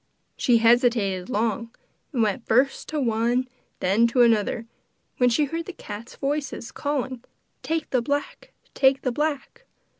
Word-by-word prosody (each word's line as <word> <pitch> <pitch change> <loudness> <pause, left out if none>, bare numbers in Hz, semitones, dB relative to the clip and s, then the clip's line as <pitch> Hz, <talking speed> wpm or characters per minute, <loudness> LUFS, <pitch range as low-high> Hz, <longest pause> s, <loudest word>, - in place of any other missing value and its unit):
She 240 -2 +3
hesitated 230 -5 +3
long, 230 +1 -1 0.4
and 245 -6 +1
went 215 +2 -1
first 260 +4 +2
to 305 - -2
one 230 -3 +1
and 255 +1 0 0.3
then 205 +6 +3
to 245 +1 +4
another, 225 0 +2 0.5
when 250 -1 +4
she 270 +5 +2
heard 330 +3 -4
the 375 - -6
cats' 215 -2 -9
voices 275 -4 -3
calling: 265 -4 -3 0.4
'Take 325 0 -2
the 255 - +2
black! 285 +3 -3 0.2
take 270 0 +3
the 255 - 0
black! 295 +1 -3
245 Hz, 150 wpm, -24 LUFS, 230-275 Hz, 0.5 s, to